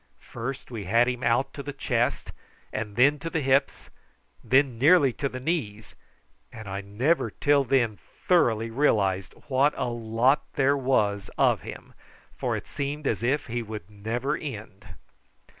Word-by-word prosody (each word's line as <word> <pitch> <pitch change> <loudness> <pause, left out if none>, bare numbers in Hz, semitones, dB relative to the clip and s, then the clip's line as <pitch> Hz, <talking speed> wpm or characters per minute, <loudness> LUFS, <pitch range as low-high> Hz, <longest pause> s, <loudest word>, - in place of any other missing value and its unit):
First 125 +3 -6
we 110 -4 -5
had 115 +6 +3
him 125 -1 -2
out 125 +4 +1
to 140 - -6
the 145 0 -6
chest, 125 -2 -1 0.4
then 120 +7 +2
to 165 - -5
the 160 - -1
hips, 135 0 0 0.5
then 130 -3 +2
nearly 145 -2 +5
to 140 - -2
the 130 - -6
knees, 120 - -3 0.6
and 110 -2 -10
I 100 +1 -4
never 120 +12 0
till 145 -1 +2
then 120 -6 +1 0.3
thoroughly 115 -11 +3
realised 100 -8 +1
what 140 +2 +2
a - - -1
lot 120 +4 +1
there 140 0 +3
was 105 -8 0
of - - +3
him, - - -10 0.4
for - - -2
it - - -8
seemed 145 +1 -4
as 110 -5 0
if 135 +5 0
he 120 0 -3
would 105 -3 -8
never 115 +6 -2
end. 105 -7 -8
125 Hz, 155 wpm, -26 LUFS, 110-140 Hz, 0.6 s, nearly